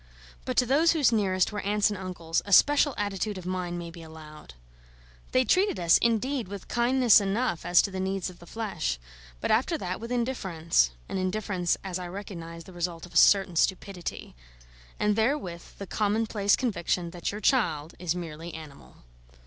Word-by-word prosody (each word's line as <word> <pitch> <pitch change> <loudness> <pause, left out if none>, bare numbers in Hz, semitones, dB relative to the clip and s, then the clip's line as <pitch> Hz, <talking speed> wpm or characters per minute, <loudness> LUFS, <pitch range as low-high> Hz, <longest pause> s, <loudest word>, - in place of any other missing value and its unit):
But - - -3
to 250 - +5
those 300 +7 +4
whose 295 -7 +3
nearest 190 -4 +1
were 210 -1 -4
aunts 210 +1 +1
and 205 - -4
uncles, 175 -3 -2
a 200 - -9
special 290 - +5
attitude 205 0 -2
of 180 - -8
mind 180 -1 -3
may 170 -1 -6
be 170 0 -11
allowed. 155 - -12 0.8
They 255 0 +3
treated 370 - +2
us, 170 -1 +5
indeed, 235 +1 0
with 200 0 -8
kindness 240 -2 +4
enough 200 -2 -1
as 175 - +5
to 200 - -2
the 190 - -4
needs 190 0 -2
of 180 -2 -10
the 175 - -14
flesh, 195 - -3 0.4
but - - -1
after 260 +9 +2
that 185 -8 -4
with 230 +2 -7
indifference 190 - +1 0.2
(an 190 - -3
indifference, 185 -1 -1
as 185 -2 -4
I 180 - -5
recognise, 170 -3 -8
the 185 - -14
result 175 -1 -4
of 180 - -16
a - - -16
certain 195 -3 +5
stupidity), 190 0 -2 0.7
and 210 0 +2
therewith 220 -7 -2
the 200 - -6
commonplace 210 0 +1
conviction 180 -7 -1
that 175 0 -3
your 205 - -6
child 170 - +1
is 175 -1 -1
merely 165 -1 -7
animal. 155 - -12
190 Hz, 180 wpm, -27 LUFS, 175-220 Hz, 0.8 s, to